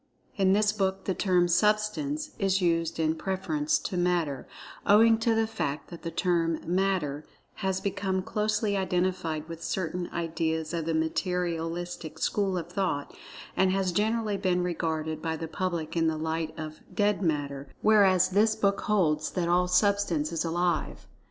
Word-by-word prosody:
In 190 Hz, -1 st, +3 dB
this 210 Hz, +1 st, +3 dB
book 195 Hz, -2 st, -1 dB
the 190 Hz, -, 0 dB
term 180 Hz, -2 st, +2 dB
"Substance" 215 Hz, -, +1 dB
is 195 Hz, -2 st, +2 dB
used 165 Hz, -2 st, 0 dB
in 160 Hz, 0 st, +2 dB
preference 160 Hz, -4 st, -1 dB
to 180 Hz, -, -4 dB
"Mat[Pg 175 Hz, -1 st, +2 dB, 0.2 s
12]ter," -, -, -26 dB, 0.4 s
owing 225 Hz, +2 st, +6 dB
to 225 Hz, 0 st, +2 dB
the 225 Hz, 0 st, +2 dB
fact 170 Hz, -11 st, -4 dB
that 170 Hz, -, -9 dB
the 165 Hz, -, -4 dB
term 165 Hz, -2 st, +1 dB
"Matter" 180 Hz, -5 st, 0 dB, 0.3 s
has 190 Hz, -2 st, -1 dB
become 190 Hz, -1 st, -1 dB
closely 210 Hz, 0 st, 0 dB
identified 180 Hz, -4 st, -1 dB
with 165 Hz, 0 st, -8 dB
certain 175 Hz, -1 st, -2 dB
ideas 160 Hz, -1 st, -2 dB
of 165 Hz, -2 st, -2 dB
the 165 Hz, 0 st, 0 dB
Materialistic 170 Hz, 0 st, -2 dB
school 195 Hz, -3 st, 0 dB
of 170 Hz, 0 st, -5 dB
thought, 180 Hz, -7 st, -2 dB, 0.4 s
and 190 Hz, 0 st, +3 dB
has 190 Hz, -1 st, +1 dB
generally 215 Hz, +2 st, 0 dB
been 180 Hz, -2 st, +1 dB
regarded 160 Hz, -3 st, -2 dB
by 160 Hz, 0 st, -2 dB
the 165 Hz, -, -5 dB
public 165 Hz, -1 st, -3 dB
in 165 Hz, -1 st, +2 dB
the 160 Hz, -1 st, 0 dB
light 160 Hz, 0 st, -2 dB
of 155 Hz, 0 st, -6 dB
"dead 205 Hz, -1 st, +1 dB
matter," 145 Hz, -5 st, -1 dB, 0.2 s
whereas 190 Hz, -4 st, +5 dB
this 215 Hz, +3 st, +3 dB
book 200 Hz, -2 st, +1 dB
holds 155 Hz, -7 st, +1 dB
that 175 Hz, -2 st, -1 dB
all 180 Hz, +1 st, +3 dB
Substance 180 Hz, -4 st, +2 dB
is 165 Hz, -, -1 dB
Alive. 175 Hz, +1 st, -1 dB
180 Hz, 160 wpm, -28 LUFS, 160-195 Hz, 0.4 s, owing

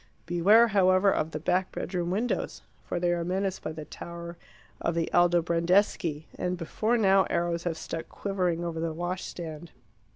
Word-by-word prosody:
Beware, 200 Hz, +7 st, +5 dB
however, 190 Hz, -1 st, +4 dB
of 155 Hz, -, 0 dB
the 155 Hz, -, -5 dB
back 180 Hz, +4 st, 0 dB
bedroom 175 Hz, -2 st, -3 dB
windows. 215 Hz, +7 st, -2 dB, 0.2 s
For -, -, -2 dB
they 175 Hz, 0 st, +2 dB
are 170 Hz, -1 st, -1 dB
menaced 190 Hz, +2 st, -2 dB
by 155 Hz, -, -4 dB
the 155 Hz, -1 st, -7 dB
tower 170 Hz, +1 st, -8 dB, 0.5 s
of 170 Hz, -, 0 dB
the 165 Hz, -1 st, -1 dB
Aldobrandeschi, 170 Hz, -1 st, +2 dB
and 180 Hz, 0 st, -1 dB
before 215 Hz, +8 st, 0 dB
now 195 Hz, -3 st, +4 dB
arrows 170 Hz, 0 st, -1 dB
have 165 Hz, -2 st, -1 dB
stuck 165 Hz, 0 st, -6 dB
quivering 180 Hz, -4 st, -1 dB
over 165 Hz, -1 st, -3 dB
the 165 Hz, -1 st, -2 dB
washstand. 170 Hz, -2 st, -5 dB
175 Hz, 160 wpm, -28 LUFS, 170-190 Hz, 0.5 s, Beware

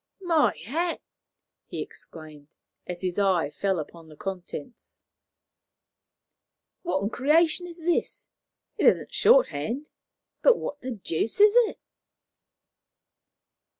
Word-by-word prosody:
"My 325 Hz, -, +2 dB
hat!" 330 Hz, -, -1 dB, 0.7 s
he -, -, -6 dB
exclaimed, 155 Hz, -3 st, -10 dB, 0.4 s
as 175 Hz, -1 st, -6 dB
his 185 Hz, 0 st, -2 dB
eye 185 Hz, -7 st, +2 dB
fell 195 Hz, +2 st, -1 dB
upon 165 Hz, +1 st, -8 dB
the 155 Hz, -, -13 dB
contents. 185 Hz, -, -8 dB, 1.8 s
"What 340 Hz, -, -1 dB
in 205 Hz, -, -2 dB
creation 320 Hz, +7 st, +2 dB
is 340 Hz, 0 st, -11 dB
this? 340 Hz, +1 st, -1 dB, 0.5 s
It -, -, +4 dB
isn't -, -, +2 dB
shorthand, 290 Hz, -, +2 dB, 0.5 s
but -, -, +5 dB
what 290 Hz, -, -6 dB
the 255 Hz, -, -5 dB
deuce 215 Hz, -, -2 dB
is 420 Hz, 0 st, +7 dB, 0.2 s
it?" -, -, -11 dB
220 Hz, 110 wpm, -26 LUFS, -, 1.8 s, is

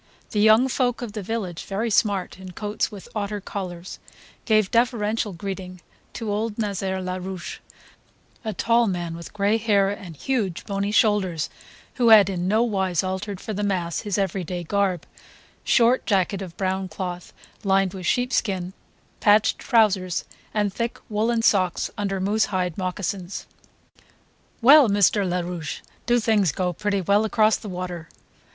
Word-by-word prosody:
The 210 Hz, -, 0 dB
young 220 Hz, +4 st, +6 dB
folk 250 Hz, -2 st, 0 dB
of 230 Hz, -, -5 dB
the 210 Hz, -, -4 dB
village, 195 Hz, -4 st, -4 dB
very 220 Hz, +4 st, -2 dB
smart 200 Hz, -3 st, +1 dB
in 185 Hz, -1 st, -9 dB
coats 210 Hz, +3 st, -2 dB
with 200 Hz, -3 st, -10 dB
otter 210 Hz, -1 st, -3 dB
collars, 185 Hz, -3 st, -6 dB, 0.5 s
gave 215 Hz, -3 st, +3 dB
deferential 225 Hz, -3 st, +1 dB
greeting 185 Hz, 0 st, -6 dB, 0.3 s
to 225 Hz, -3 st, -4 dB
old 210 Hz, +1 st, -2 dB
Nazaire 195 Hz, -3 st, -2 dB
Larouche; 185 Hz, 0 st, -5 dB, 0.8 s
a 220 Hz, -, -2 dB
tall 230 Hz, +3 st, +2 dB
man 175 Hz, -3 st, -3 dB
with 170 Hz, 0 st, -9 dB
gray 205 Hz, +1 st, +1 dB
hair 200 Hz, -3 st, +2 dB
and 185 Hz, -5 st, -8 dB
huge 205 Hz, -, -2 dB
bony 200 Hz, 0 st, -2 dB
shoulders 205 Hz, -6 st, +2 dB, 0.5 s
who 235 Hz, -, +5 dB
had 205 Hz, -3 st, +8 dB
in 180 Hz, -1 st, -2 dB
no 215 Hz, +4 st, +3 dB
wise 190 Hz, -7 st, 0 dB
altered 190 Hz, +1 st, -4 dB
for 215 Hz, -, -5 dB
the 205 Hz, -, -3 dB
mass 180 Hz, -5 st, -1 dB
his 205 Hz, -3 st, -2 dB
everyday 180 Hz, -2 st, -2 dB
garb: 190 Hz, -1 st, 0 dB, 0.6 s
short 240 Hz, +1 st, +3 dB
jacket 195 Hz, -1 st, +1 dB
of 180 Hz, -3 st, -8 dB
brown 190 Hz, 0 st, -1 dB
cloth 180 Hz, -1 st, -6 dB, 0.3 s
lined 195 Hz, -2 st, +2 dB
with 185 Hz, -3 st, -5 dB
sheepskin, 200 Hz, -7 st, 0 dB, 0.5 s
patched 210 Hz, 0 st, +4 dB
trousers, 195 Hz, -6 st, +2 dB, 0.3 s
and 205 Hz, -2 st, 0 dB
thick 235 Hz, +2 st, -3 dB
woollen 225 Hz, +2 st, +1 dB
socks 185 Hz, -6 st, +2 dB
under 200 Hz, -2 st, -2 dB
moose 205 Hz, +3 st, +2 dB
hide 180 Hz, -4 st, -2 dB
moccasins. 185 Hz, 0 st, -4 dB, 1.2 s
"Well, 275 Hz, -1 st, +8 dB
Mr. 200 Hz, -1 st, +3 dB
Larouche, 175 Hz, -3 st, -3 dB, 0.3 s
do 240 Hz, 0 st, +4 dB
things 215 Hz, -7 st, +2 dB
go 180 Hz, +2 st, -1 dB
pretty 200 Hz, +2 st, -1 dB
well 200 Hz, +4 st, +3 dB
across 215 Hz, 0 st, +3 dB
the 210 Hz, -, -8 dB
water?" 180 Hz, -3 st, -6 dB
200 Hz, 150 wpm, -24 LUFS, 185-215 Hz, 1.2 s, had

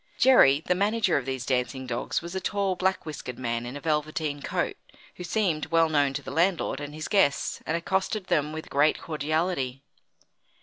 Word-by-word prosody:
Jerry, 155 Hz, -, +6 dB
the -, -, +3 dB
manager 205 Hz, +1 st, +1 dB
of 135 Hz, -2 st, -4 dB
these 130 Hz, -2 st, -3 dB
dancing 130 Hz, 0 st, -1 dB
dogs, 120 Hz, +5 st, -2 dB
was 170 Hz, +1 st, -7 dB
a 190 Hz, -, -3 dB
tall 200 Hz, -2 st, 0 dB
black 185 Hz, +1 st, 0 dB
whiskered 135 Hz, -5 st, -6 dB
man 120 Hz, -1 st, -2 dB
in 130 Hz, +3 st, -6 dB
a -, -, -7 dB
velveteen 150 Hz, -1 st, -1 dB
coat, -, -, -2 dB, 0.4 s
who 180 Hz, -, -6 dB
seemed 175 Hz, -4 st, 0 dB
well 165 Hz, -1 st, +3 dB
known 145 Hz, -3 st, +2 dB
to -, -, -4 dB
the -, -, -7 dB
landlord 165 Hz, -2 st, +1 dB
and 145 Hz, 0 st, -7 dB
his 155 Hz, -, -5 dB
guests 140 Hz, -9 st, +2 dB
and 160 Hz, -, +1 dB
accosted 190 Hz, +3 st, -1 dB
them 150 Hz, -4 st, +1 dB
with 160 Hz, 0 st, -6 dB
great 145 Hz, +2 st, +3 dB
cordiality. 155 Hz, -3 st, -2 dB
155 Hz, 185 wpm, -27 LUFS, 140-180 Hz, 0.4 s, Jerry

